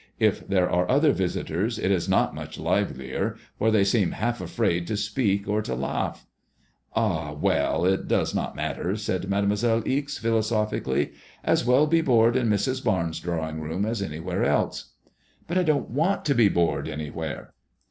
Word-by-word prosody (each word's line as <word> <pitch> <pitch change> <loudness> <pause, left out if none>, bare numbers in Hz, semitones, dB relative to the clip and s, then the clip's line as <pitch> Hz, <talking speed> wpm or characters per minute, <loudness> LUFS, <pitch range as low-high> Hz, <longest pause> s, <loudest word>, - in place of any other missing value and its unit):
U - - +4
there 95 -2 0
are 90 0 +1
other 145 +3 +4
visitors 95 +3 -1
it 95 - 0
is 90 -1 0
not - - +2
much - - -7
livelier, - - -1 0.2
for 110 - +3
they 110 -3 +4
seem 100 -2 +2
half 120 +2 -2
afraid 90 -7 0
to 110 - -1
speak 105 -1 0
or 105 +1 +1
to 65 - -4
laagh." 65 +1 -2 0.8
Ah 85 -10 0
1 75 - -9
well, 80 +3 +1
it 95 +1 +1
does - - +1
not - - -2
matter/' 95 +3 -2
said 95 -3 -2
Mademoiselle 105 +3 +1
Ixe, 140 +1 -1
philosophically. 110 - 0 0.3
As - - +2
well 130 +4 +5
be 165 +2 +3
bored 120 -5 +4
in 125 -3 +2
Mrs. 125 +6 0
Barnes' 85 - 0
drawing 80 -2 -3
room 80 +6 -2
as 110 -1 -2
anywhere 90 0 -3
else." - - 0 0.3
'* - - -36
But 175 +2 +1
I - - +2
don't 155 -7 0
want 165 +10 0
to 140 - +3
be 115 -5 +5
bored 85 -3 +1
anywhere." 75 0 -5
100 Hz, 175 wpm, -25 LUFS, 85-120 Hz, 0.8 s, well